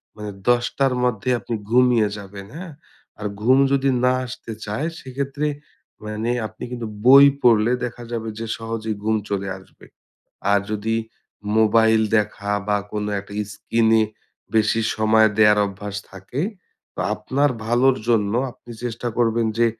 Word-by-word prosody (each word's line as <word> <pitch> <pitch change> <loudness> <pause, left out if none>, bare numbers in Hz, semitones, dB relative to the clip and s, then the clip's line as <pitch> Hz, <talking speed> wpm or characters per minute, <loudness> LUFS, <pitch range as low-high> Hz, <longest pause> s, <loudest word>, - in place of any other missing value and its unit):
মানে 105 -1 -6 0.2
১০ঃ০০ 120 0 +3
টার 135 -1 +2
মধ্যে 125 -2 0
আপনি 115 - -4
ঘুমিয়ে 120 -2 +4
যাবেন 100 -1 -9
হ্যাঁ? 180 -1 -7 0.5
আর 105 - -6 0.2
ঘুম 130 +4 +5
যদি 140 0 +2
না 125 0 +4
আসতে 125 -2 -8
চায় 110 +10 -2
সেক্ষেত্রে 140 +3 -3 0.6
মানে 110 +2 -2 0.2
আপনি - - -12
কিন্তু 120 -2 -4 0.2
বই 135 +2 +9 0.2
পড়লে 115 -2 +4
দেখা 120 0 -7
যাবে 115 -1 -3
যে 115 - -3
সহজেই 115 -1 -4
ঘুম 110 +1 +2
চলে 100 -1 -2
আসবে। 95 - -18 0.7
আর 100 -1 +4
যদি 110 +1 -1 0.6
মোবাইল 110 0 +4 0.2
দেখা 105 -1 -1 0.2
বা 105 - +3 0.2
কোনো 105 0 -2
একটা 100 - -14 0.2
স্ক্রীন 115 +1 +1
এ - - +4 0.5
বেশি 110 +1 +3 0.2
সময় 110 0 +4
দেয়ার 105 -1 +6
অভ্যাস 100 +1 -6
থাকে, 95 +8 -6 0.5
তো - - -5
আপনার 135 +7 0 0.2
ভালোর 125 +3 +3
জন্য 105 -4 +2 0.2
আপনি 120 - -16
চেষ্টা 120 0 -3
করবেন 115 -1 +2
যে, 120 - +5
115 Hz, 150 wpm, -22 LUFS, 105-125 Hz, 0.7 s, বই